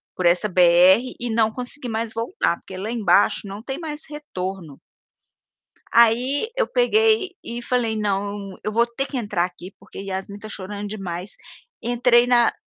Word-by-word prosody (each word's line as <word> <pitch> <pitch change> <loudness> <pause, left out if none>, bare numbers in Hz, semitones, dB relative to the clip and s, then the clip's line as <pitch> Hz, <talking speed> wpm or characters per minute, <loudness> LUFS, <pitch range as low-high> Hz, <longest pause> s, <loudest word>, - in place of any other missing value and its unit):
por 185 - -2
essa 180 +5 +3
BR, 180 +2 +6 0.2
e 245 - -3
não 220 -1 +3
conseguir 250 +2 -5
mais 225 0 -3
voltar, 230 - -1
porque 190 - -11
lá 205 +4 -4
embaixo 205 -5 +3
não 200 +2 -8
tem 270 +4 -5
mais 305 -3 -6
retorno 190 - -6 1.2
aí 245 - +3
eu - - +2
peguei 440 -5 +2
e 235 +1 -6
falei: 240 -2 0
"Não, 200 -1 -3
eu 215 - -2
vou 235 +2 +3
ter 240 +3 -3
que 270 - -4
entrar 205 -7 0
aqui, 180 +1 -10
porque - - -12
Yasmin 195 +1 -5
está 215 - -10
chorando 205 +1 -6
demais", 195 -2 -6 0.5
entrei 240 0 +4
na 240 -1 +4
220 Hz, 160 wpm, -22 LUFS, 195-245 Hz, 1.2 s, BR